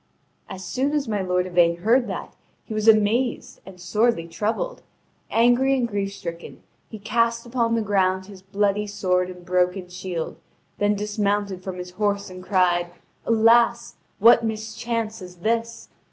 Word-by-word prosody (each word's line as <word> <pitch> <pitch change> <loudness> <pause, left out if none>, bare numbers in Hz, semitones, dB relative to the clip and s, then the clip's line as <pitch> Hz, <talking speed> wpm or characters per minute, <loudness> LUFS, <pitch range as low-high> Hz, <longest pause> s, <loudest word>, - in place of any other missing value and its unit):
As 190 -1 -7
soon 265 +9 -1
as 295 -3 0
my 210 -3 -1
lord 180 -1 0
Yvain 175 -2 +3
heard 240 +4 +3
that, 190 - -6 0.3
he 220 - -7
was 215 0 -1
amazed 225 +3 +2
and 190 -1 -12
sorely 210 -1 +1
troubled; 220 - -3 0.5
angry 245 +4 +3
and 245 -2 0
grief 200 -2 -2
stricken, 170 -3 -8 0.3
he 220 - -8
cast 230 +2 0
upon 235 -1 0
the 225 - 0
ground 190 -2 +1
his 195 -1 -13
bloody 200 +2 0
sword 185 -3 0
and 180 -1 -11
broken 180 +1 0
shield, 180 -2 -5 0.4
then 205 0 +2
dismounted 205 -2 -1
from 185 -1 -5
his 180 0 -7
horse, 200 0 -1
and 185 0 -9
cried: 180 -3 +2 0.4
"Alas, 235 +1 +3 0.2
what 235 +2 +6
mischance 220 0 -3
is 180 -1 -10
this! 230 +5 -2
205 Hz, 155 wpm, -23 LUFS, 185-230 Hz, 0.5 s, what